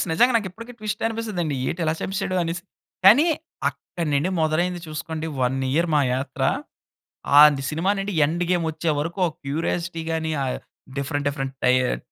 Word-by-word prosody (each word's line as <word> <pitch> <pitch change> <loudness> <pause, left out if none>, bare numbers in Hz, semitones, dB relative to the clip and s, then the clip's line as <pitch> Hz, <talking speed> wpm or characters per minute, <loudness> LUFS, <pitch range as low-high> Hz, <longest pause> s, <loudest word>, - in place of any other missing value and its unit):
Climax - - 0
నిజంగా 240 +11 +4
నాకిప్పటికి 225 +3 -5
twist 215 -1 -4
అనిపిస్తుందండి. 215 -9 -2
ఏటి 170 - -3
ఇలా 155 - +2
సంపిశాడు, 195 -1 -2
అనేసి. 170 +1 -3 0.4
కానీ, 230 - +8 0.4
అక్కడి 170 -3 -5
నుండి 145 +6 +1
మొదలైంది 175 +3 +1
చూసుకోండి. 155 +1 -5
1 125 +1 +1 0.2
ఇయర్ 170 +4 +2
మా 150 - +5
యాత్ర. 130 +1 -4 1.0
ఆంది 150 -2 +7
సినిమానండి, 195 +5 0
'ఎండ్ 170 +4 0
గేమ్' 175 -2 +2
వచ్చేవరకు 160 +2 -2
ఓ - - +1 0.2
క్యూరియాసిటీ 165 +3 -2
గాని, 160 -1 -1
ఆహ్, 130 - -2 0.4
డిఫరెంట్ 145 +1 -2
డిఫరెంట్ 135 -2 -4
టయర్ 125 - +3
165 Hz, 150 wpm, -23 LUFS, 145-185 Hz, 1.0 s, కానీ